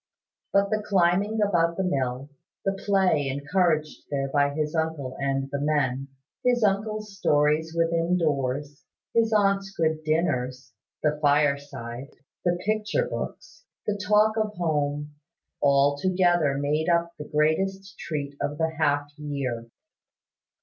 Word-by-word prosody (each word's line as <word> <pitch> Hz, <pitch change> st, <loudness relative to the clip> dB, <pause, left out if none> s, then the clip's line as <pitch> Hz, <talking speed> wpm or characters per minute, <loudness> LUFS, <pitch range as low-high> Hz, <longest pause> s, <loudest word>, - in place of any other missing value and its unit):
But 200 Hz, +1 st, +2 dB
the 215 Hz, 0 st, +1 dB
climbing 200 Hz, +2 st, +2 dB
about 170 Hz, -4 st, +2 dB
the 190 Hz, -, 0 dB
mill, 135 Hz, -4 st, -2 dB, 0.3 s
the 195 Hz, -, +3 dB
play 190 Hz, -7 st, +2 dB
encouraged 155 Hz, +3 st, 0 dB
there 135 Hz, -1 st, -1 dB
by 145 Hz, 0 st, +2 dB
his 150 Hz, +1 st, -2 dB
uncle 160 Hz, -5 st, -2 dB
and 135 Hz, 0 st, -1 dB
the 140 Hz, 0 st, -2 dB
men, 140 Hz, -3 st, 0 dB, 0.4 s
his 245 Hz, -2 st, +2 dB
uncle's 210 Hz, 0 st, 0 dB
stories 150 Hz, -1 st, +2 dB
within 165 Hz, +1 st, +2 dB
doors, 145 Hz, -2 st, -1 dB, 0.3 s
his 225 Hz, -1 st, +3 dB
aunt's 195 Hz, -2 st, +2 dB
good 160 Hz, -4 st, -1 dB
dinners, 130 Hz, -6 st, -1 dB, 0.3 s
the 150 Hz, -1 st, +1 dB
fire 145 Hz, -1 st, +3 dB
side, 135 Hz, -2 st, -8 dB, 0.3 s
the 175 Hz, -1 st, +1 dB
picture 215 Hz, -, 0 dB
books, -, -, -7 dB, 0.2 s
the 210 Hz, -, 0 dB
talk 210 Hz, +2 st, +3 dB
of 215 Hz, -1 st, -1 dB
home, 150 Hz, -3 st, -1 dB, 0.5 s
altogether 145 Hz, +2 st, +3 dB
made 150 Hz, +4 st, 0 dB
up 170 Hz, 0 st, +2 dB
the 150 Hz, -, -5 dB
greatest 190 Hz, +6 st, 0 dB
treat 145 Hz, -3 st, -4 dB
of 145 Hz, -, -2 dB
the 160 Hz, 0 st, 0 dB
half 145 Hz, -2 st, +2 dB
year. 135 Hz, -6 st, -3 dB
155 Hz, 130 wpm, -26 LUFS, 145-195 Hz, 0.5 s, the